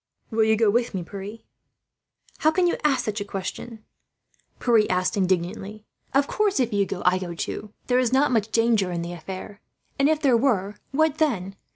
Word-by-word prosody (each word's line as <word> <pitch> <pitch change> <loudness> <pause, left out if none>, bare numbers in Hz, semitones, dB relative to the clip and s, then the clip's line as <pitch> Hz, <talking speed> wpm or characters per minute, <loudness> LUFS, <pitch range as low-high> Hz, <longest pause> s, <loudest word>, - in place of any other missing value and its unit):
'" - - -43
"Will 220 0 +3
you 220 0 +4
go 220 -1 +3
with 235 -1 0
me, 180 - -2
Pierre?" 200 +4 -8 1.0
"How 310 - +4
can 355 +3 +2
you 350 - +2
ask 290 -3 +2
such 215 -1 -2
a - - 0
question?" 205 +3 -6 0.7
Pierre 210 -6 +2
said, - - 0
indignantly. 190 +3 -1 0.3
"Of 275 +1 +3
course, 415 -5 +1
if 240 -3 +1
you 200 -1 +2
go 185 - -5
I 180 +1 +4
go, 175 -2 -5
too. 210 +4 -5
There 250 0 +2
is 250 -2 +1
not 270 +2 +3
much 225 -3 +1
danger 225 -5 +2
in 170 -1 -2
the 170 +1 -5
affair; 190 +4 -8 0.4
and 275 +2 +4
if 315 -1 +2
there 275 -5 +3
were, 220 -6 +1 0.2
what 315 +2 +1
then? 195 - 0
215 Hz, 200 wpm, -24 LUFS, 190-255 Hz, 1.0 s, you